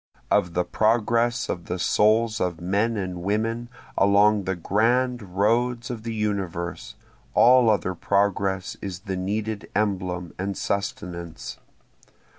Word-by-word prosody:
Of 90 -1 +2
the 90 - +2
progress 115 +4 +1
of 85 -2 -4
the 90 - -3
souls 110 +4 +2
of 90 -3 -1
men 100 +6 0
and 90 -3 -4
women 115 +5 -1 0.3
along 100 0 +4
the 95 +1 -1
grand 120 +7 +1 0.2
roads 120 +4 +1
of 115 -3 -5
the 115 0 -4
universe, 100 -1 -3 0.4
all 125 -1 +6
other 100 -3 +1
progress 100 0 0
is 95 -2 -5
the 95 -2 -4
needed 105 +3 -3
emblem 90 -4 -1
and 100 +1 -2
sustenance. 100 -6 -4
100 Hz, 125 wpm, -24 LUFS, 90-115 Hz, 0.4 s, all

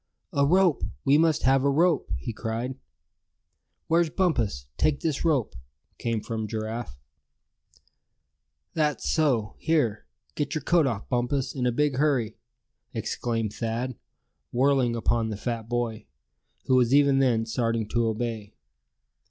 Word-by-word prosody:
"A 140 0 +3
rope! 180 -1 +3 0.2
We 140 +2 +5
must 160 -2 +2
have 135 +1 +4
a 140 - +3
rope!" 165 - +2
he 65 - -5
cried. 115 +3 -3 1.1
"Where's 165 0 +2
Bumpus? 120 - 0
Take 150 -2 +1
this 155 -4 -1
rope!" 145 -9 +1 0.4
came 115 -2 -1
from 110 -1 -4
Giraffe. 110 - -5 1.7
"That's 150 -3 0
so; 130 -10 +1
here, 120 - 0 0.3
get 145 0 -2
your 155 - -2
coat 165 -2 +3
off, 110 -5 -3
Bumpus, 125 +2 -1
in 125 -2 -1
a - - +2
big 145 +1 +1
hurry!" 135 -7 +1 0.6
exclaimed 115 -3 -2
Thad, 115 +3 -3 0.6
whirling 130 -1 +2
upon 115 0 0
the 105 - -4
fat 115 0 -4
boy, 115 -3 -2 0.6
who - - +1
was 125 +1 +4
even 140 -1 +5
then 120 -4 +2
starting 115 -1 -1
to 120 -1 +1
obey. 110 -2 -3
125 Hz, 135 wpm, -26 LUFS, 115-145 Hz, 1.7 s, We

